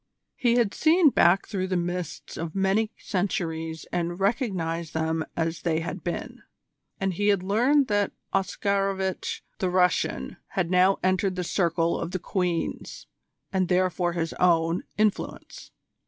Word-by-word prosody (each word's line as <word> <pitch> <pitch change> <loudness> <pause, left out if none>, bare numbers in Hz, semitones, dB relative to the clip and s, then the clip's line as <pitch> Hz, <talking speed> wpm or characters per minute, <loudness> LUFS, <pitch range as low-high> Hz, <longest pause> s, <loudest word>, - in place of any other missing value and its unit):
He 240 -1 +2
had 235 -5 +2
seen 320 -1 +5
back 180 -2 +4
through 190 -3 -2
the 185 -1 0
mists 175 -1 -4
of 165 +1 -5
many 195 +3 +2
centuries 165 -4 -2
and 175 0 -2
recognised 185 - -1
them 160 0 0
as 165 0 -1
they 165 -2 0
had 175 +1 -5
been, 175 - -4 0.6
and 195 -1 0
he 205 +4 0
had 200 -3 +3
learned 250 +9 +3
that 205 -1 +1 0.2
Oscarovitch 195 0 -1 0.2
the 185 - 0
Russian 180 0 +1 0.2
had 180 -2 +1
now 185 +1 +4
entered 185 0 +1
the 180 - -2
circle 170 -2 +1
of 170 +1 -4
the - - +1
Queen's, 180 -2 -2 0.5
and 185 -1 +2
therefore 180 -1 +1
his 165 -1 -2
own, 165 -1 +3 0.2
influence. 215 -1 -2
185 Hz, 140 wpm, -26 LUFS, 170-195 Hz, 0.6 s, seen